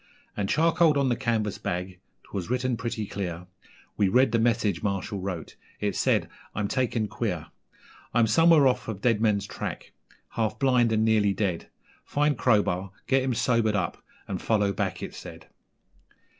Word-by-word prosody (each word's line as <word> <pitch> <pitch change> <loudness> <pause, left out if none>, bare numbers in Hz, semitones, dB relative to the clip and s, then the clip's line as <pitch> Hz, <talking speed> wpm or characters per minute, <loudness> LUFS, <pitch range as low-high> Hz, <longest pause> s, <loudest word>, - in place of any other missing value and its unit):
And 100 -2 -2
charcoaled 165 -1 +3
on 140 -2 +2
the 120 - +2
canvas 110 -4 -1
bag 90 +1 -4 0.2
('twas 95 -2 -6
written 125 0 0
pretty 115 -1 -3
clear) 90 -4 -5 0.5
We 100 -3 +3
read 130 +6 +4
the 115 - +2
message 110 -6 +1
Marshall 100 0 -2
wrote. 90 -4 -5 0.2
It 105 -1 -1
said: - - +2 0.3
'I'm 105 -1 -1
taken 120 -4 0
queer 105 -8 -3 0.7
I'm 120 -1 +4
somewhere 160 +6 +5
off 130 - 0
of 110 -4 -4
Deadman's 110 -4 +2
Track, - - -6 0.4
half 110 -1 -2
blind 125 -3 +3
and 110 0 +2
nearly 105 -3 +3
dead; 95 -5 -2 0.3
Find 145 0 +1
Crowbar, 100 -6 +1 0.2
get 135 0 +2
him 130 -2 -1
sobered 115 -3 +2
up, 95 -3 -2 0.2
and - - -4
follow 105 -3 +1
back,' - - -3
it - - -6
said. - - -10
110 Hz, 155 wpm, -26 LUFS, 100-125 Hz, 0.7 s, somewhere